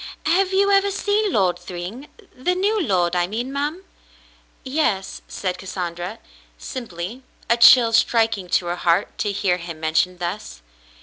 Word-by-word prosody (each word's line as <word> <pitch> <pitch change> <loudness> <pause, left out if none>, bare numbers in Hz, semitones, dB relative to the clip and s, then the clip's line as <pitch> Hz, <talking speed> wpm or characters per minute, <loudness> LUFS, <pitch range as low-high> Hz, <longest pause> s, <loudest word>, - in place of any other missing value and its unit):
"Have 370 +4 +2
you 400 +1 +3
ever 395 0 +4
seen 410 +1 0
Lord 185 - +1
Thryng 185 +10 -7 0.2
— 390 - -28
the 360 +9 0
new 410 +3 +1
lord, 180 - +1
I 175 0 +1
mean, 240 +7 -4
ma'm? 295 +6 -3 0.4
" - - -33
"Yes," 260 -9 -1
said 185 -1 -4
Cassandra, 175 -2 -5 0.4
simply, 210 - -6 0.3
a 235 - +4
chill 235 -1 +7
striking 225 -5 +2
to 180 -1 +1
her 175 +1 -2
heart 175 +3 +1
to 205 - 0
hear 190 -2 0
him 170 -2 -8
mentioned 165 +3 +1
thus. 175 - -6
210 Hz, 160 wpm, -22 LUFS, 180-295 Hz, 0.4 s, chill